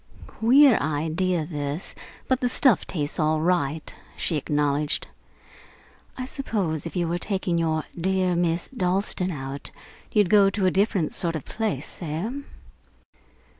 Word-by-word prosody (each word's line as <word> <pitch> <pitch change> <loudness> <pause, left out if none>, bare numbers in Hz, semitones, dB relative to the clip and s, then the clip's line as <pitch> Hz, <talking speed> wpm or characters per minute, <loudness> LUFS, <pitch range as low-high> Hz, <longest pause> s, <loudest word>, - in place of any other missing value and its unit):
"Queer 255 +2 +5
idea, 160 +3 0
this, 145 +1 -4 0.3
but 260 -1 +2
the 250 - +1
stuff 250 -3 +3
tastes 150 -4 -3
all 155 0 +2
right," 160 -3 0 0.2
she 165 - -1
acknowledged. 150 0 0 1.1
"I 255 - -3
suppose, 195 - -2
if 165 - -9
you 175 -2 0
were 170 +1 -1
taking 185 -3 -1
your 160 -1 0
dear 185 0 +1
Miss 170 0 0
Dalstan 190 -4 0
out, 140 -3 -5 0.4
you'd 205 -4 +3
go 200 -2 +6
to 195 -1 -1
a 185 - +4
different 195 -4 +1
sort 170 -3 -1
of 155 - -5
place, 220 -2 -3
eh?" 165 +7 -3
175 Hz, 135 wpm, -25 LUFS, 155-200 Hz, 1.1 s, go